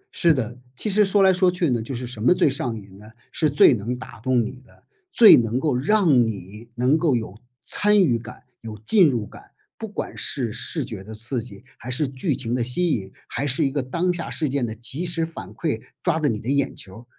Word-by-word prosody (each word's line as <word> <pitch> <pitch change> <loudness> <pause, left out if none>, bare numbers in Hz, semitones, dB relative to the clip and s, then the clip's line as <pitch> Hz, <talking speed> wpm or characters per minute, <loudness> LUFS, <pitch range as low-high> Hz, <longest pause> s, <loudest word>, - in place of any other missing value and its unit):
是 170 -2 +4
的， 120 -5 -2 0.2
其 210 - -1
实 210 +2 +5
说 195 0 +3
来 190 - +5
说 185 0 +3
去 175 -6 0
呢， 120 - 0
就 125 +4 -6
是 125 +1 -5
什 120 -3 -8
么 180 +10 +4
最 - - +3
上 125 -5 -2
瘾 100 -1 -15
呢？ 105 - -14 0.3
是 155 -2 0
最 140 -1 +6
能 120 +3 -3
打 125 -3 -11
动 125 0 +1
你 130 +3 -8
的， 120 - -24 0.3
最 225 -3 +9
能 120 +1 +1
够 145 -3 0
让 145 - +3
你 105 +2 -8
能 130 +6 +2
够 155 -7 +2
有 110 -3 -5 0.2
参 210 -1 +3
与 120 -9 +1
感、 115 - -12 0.2
有 110 -2 -8
进 190 -8 +5
入 115 -5 -2
感， - - -14 0.3
不 220 - -7
管 210 - -6
是 120 -6 -1
视 130 +4 -2
觉 100 -4 -8
的 110 +2 -9
刺 115 +3 -1
激， 100 -1 -11 0.2
还 125 - -9
是 140 +4 0
剧 130 -1 -2
情 120 -3 -3
的 125 -1 0
吸 165 +9 +1
引， 95 -7 -3 0.2
还 145 - -3
是 145 +4 +2
一 135 - 0
个 145 - -1
当 170 +8 -1
下 170 -2 -4
事 155 - -1
件 130 -3 -1
的 110 - -6
即 125 +8 -3
时 170 -2 +1
反 160 - -9
馈， 115 0 -3 0.2
抓 170 -3 +1
着 150 -2 +1
你 110 -3 -2
的 110 - -10
眼 140 0 0
球 95 +2 -9
儿， 120 - -16
130 Hz, 260 characters per minute, -23 LUFS, 115-160 Hz, 0.3 s, 最